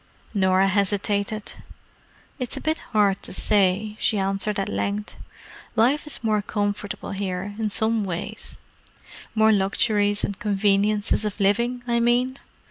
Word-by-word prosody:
Norah 190 -1 +3
hesitated. 200 +2 0 0.9
"It's 250 -2 -3
a - - -2
bit 315 +1 -1
hard 205 -3 +3
to - - -4
say," 205 +1 +1
she 215 - +1
answered 195 +2 -1
at 195 - -1
length. 205 +1 -2 0.6
"Life 255 +7 +3
is 300 - -4
more 215 -2 +2
comfortable 205 -1 -3
here, 195 0 -3
in 220 -1 0
some 220 +2 +1
ways: 175 -3 -5 0.8
more 220 0 +5
luxuries 205 +1 +2
and 200 - -2
conveniences 205 +1 +2
of 210 0 -3
living, 235 +5 +1
I 235 -1 +1
mean. 245 +3 +2
205 Hz, 130 wpm, -24 LUFS, 195-220 Hz, 0.9 s, more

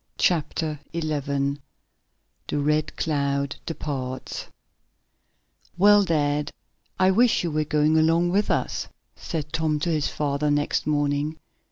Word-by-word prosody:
Chapter 155 -2 0
11 140 -3 -1 0.9
The - - -2
Red 150 +1 0
Cloud 140 -2 -1
Departs 135 -5 -4 1.3
"Well, 205 +2 +7
dad, 150 -4 0 0.5
I 185 0 +4
wish 235 +2 +3
you 170 - -1
were 155 0 0
going 150 +1 +2
along 165 +2 +3
with 205 +3 +1
us," - - -1 0.3
said 155 -2 -5
Tom 155 -2 0
to 170 - 0
his 155 -2 +1
father 145 0 -1
next 145 +1 0
morning. 145 +1 0
150 Hz, 120 wpm, -25 LUFS, 145-165 Hz, 1.3 s, Well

